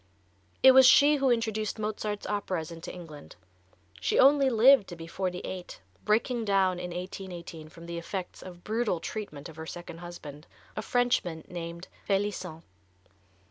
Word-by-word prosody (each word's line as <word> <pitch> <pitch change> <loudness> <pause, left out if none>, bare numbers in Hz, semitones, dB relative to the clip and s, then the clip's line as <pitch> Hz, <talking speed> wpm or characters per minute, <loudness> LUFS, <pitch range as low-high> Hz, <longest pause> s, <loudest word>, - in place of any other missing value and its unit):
It 265 - +10
was 260 0 +8
she 290 +3 +7
who 270 -1 +2
introduced 220 -3 0
Mozart's 210 -1 -3
operas 185 -5 -3
into 165 0 -8
England. 155 - -11 0.6
She - - 0
only 275 0 +6
lived 245 -1 +6
to 175 - -8
be 165 -1 -9
forty 180 +1 -3
eight, 185 -1 -7 0.3
breaking 230 +3 +1
down 190 -3 +2
in 180 0 -5
1818, 175 -3 -7
from 165 +1 -13
the 170 0 -5
effects 180 +1 -6
of 175 -1 -11
brutal 215 -5 -1
treatment 165 -8 -6
of 160 - -13
her 160 0 -7
second 175 -1 -8
husband, 160 -4 -10 0.3
a - - -2
Frenchman, 215 -10 0
named 170 0 -7 0.2
Felissent. 195 -5 -2
185 Hz, 150 wpm, -28 LUFS, 170-220 Hz, 0.6 s, It